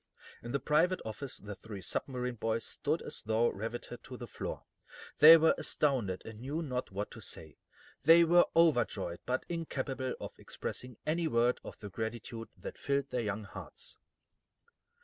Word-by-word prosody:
In 120 Hz, -, -6 dB
the 140 Hz, -, +1 dB
private 165 Hz, +7 st, +3 dB
office 110 Hz, +5 st, -5 dB
the 105 Hz, 0 st, -7 dB
three 100 Hz, -1 st, -9 dB
submarine 125 Hz, +5 st, -2 dB
boys 115 Hz, 0 st, -1 dB
stood -, -, -1 dB
as -, -, -5 dB
though 110 Hz, +2 st, +2 dB
riveted 115 Hz, +3 st, -6 dB
to 125 Hz, -, -8 dB
the 120 Hz, -, -6 dB
floor. -, -, -6 dB, 0.6 s
They 160 Hz, +2 st, +12 dB
were 160 Hz, 0 st, +5 dB
astounded, 120 Hz, -11 st, 0 dB
and 110 Hz, -1 st, -9 dB
knew 145 Hz, +7 st, -3 dB
not 125 Hz, -4 st, -3 dB
what 100 Hz, +2 st, -4 dB
to 115 Hz, -, -9 dB
say. 80 Hz, -6 st, -6 dB, 0.4 s
They 165 Hz, +4 st, +8 dB
were 175 Hz, +1 st, +6 dB
overjoyed, 120 Hz, -, +3 dB
but 130 Hz, +1 st, 0 dB
incapable 135 Hz, -6 st, -3 dB
of -, -, -6 dB
expressing 125 Hz, -2 st, -6 dB
any 165 Hz, +2 st, +1 dB
word 120 Hz, -3 st, +2 dB
of -, -, -9 dB
the 105 Hz, -3 st, -8 dB
gratitude 115 Hz, +2 st, -5 dB
that -, -, -8 dB
filled 140 Hz, -1 st, 0 dB
their 125 Hz, -, 0 dB
young 105 Hz, -1 st, -2 dB
hearts. 475 Hz, -, -10 dB
125 Hz, 165 wpm, -33 LUFS, 110-150 Hz, 0.6 s, They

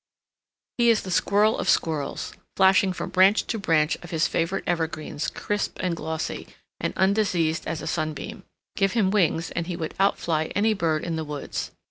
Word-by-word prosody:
He 235 Hz, 0 st, +5 dB
is 225 Hz, -2 st, +3 dB
the 185 Hz, -, -6 dB
squirrel 205 Hz, +4 st, +3 dB
of -, -, -1 dB
squirrels, 155 Hz, -4 st, 0 dB, 0.2 s
flashing 190 Hz, 0 st, +5 dB
from 180 Hz, 0 st, -5 dB
branch 190 Hz, +3 st, +4 dB
to 225 Hz, -, -3 dB
branch 160 Hz, -5 st, +2 dB
of 175 Hz, -, -10 dB
his 165 Hz, -2 st, +1 dB
favorite 170 Hz, +4 st, -1 dB
evergreens 160 Hz, -3 st, -2 dB
crisp 205 Hz, 0 st, -3 dB
and 180 Hz, -2 st, -1 dB
glossy 160 Hz, 0 st, -4 dB, 0.3 s
and -, -, -1 dB
undiseased 190 Hz, -4 st, +1 dB
as 160 Hz, 0 st, -3 dB
a -, -, -5 dB
sunbeam. 165 Hz, +7 st, -3 dB, 0.3 s
Give 195 Hz, -2 st, +1 dB
him 205 Hz, -5 st, +2 dB
wings 175 Hz, -4 st, +1 dB
and 170 Hz, 0 st, -3 dB
he 180 Hz, -, -3 dB
would 160 Hz, -2 st, -4 dB
outfly 165 Hz, -5 st, +1 dB
any 215 Hz, +2 st, +3 dB
bird 160 Hz, -6 st, 0 dB
in 165 Hz, -2 st, -2 dB
the 160 Hz, -, -2 dB
woods. 150 Hz, -2 st, -5 dB
175 Hz, 175 wpm, -25 LUFS, 160-195 Hz, 0.3 s, He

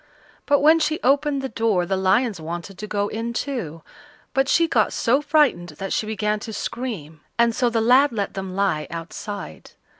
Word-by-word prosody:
But 285 Hz, -1 st, +4 dB
when 315 Hz, +3 st, +6 dB
she 315 Hz, 0 st, 0 dB
opened 280 Hz, +1 st, +2 dB
the -, -, -1 dB
door 220 Hz, -7 st, +1 dB
the 190 Hz, -, -1 dB
lions 190 Hz, +1 st, +1 dB
wanted 170 Hz, +4 st, -6 dB
to 210 Hz, -, -5 dB
go 205 Hz, -1 st, -1 dB
in 230 Hz, +3 st, -4 dB
too, 185 Hz, -, -4 dB, 0.5 s
but 270 Hz, +1 st, +1 dB
she 335 Hz, 0 st, +4 dB
got -, -, +2 dB
so 260 Hz, +4 st, +2 dB
frightened 285 Hz, -, +2 dB
that 195 Hz, 0 st, -3 dB
she 215 Hz, -, -1 dB
began 215 Hz, -1 st, -1 dB
to 220 Hz, +1 st, -7 dB
scream, 195 Hz, -, -5 dB, 0.2 s
and 235 Hz, 0 st, +3 dB
so 245 Hz, +1 st, +1 dB
the 230 Hz, -1 st, 0 dB
lad 255 Hz, +5 st, +5 dB
let 205 Hz, -4 st, -3 dB
them 190 Hz, -1 st, -5 dB
lie 190 Hz, -6 st, 0 dB
outside. 175 Hz, +5 st, -7 dB
220 Hz, 185 wpm, -23 LUFS, 190-265 Hz, 0.5 s, when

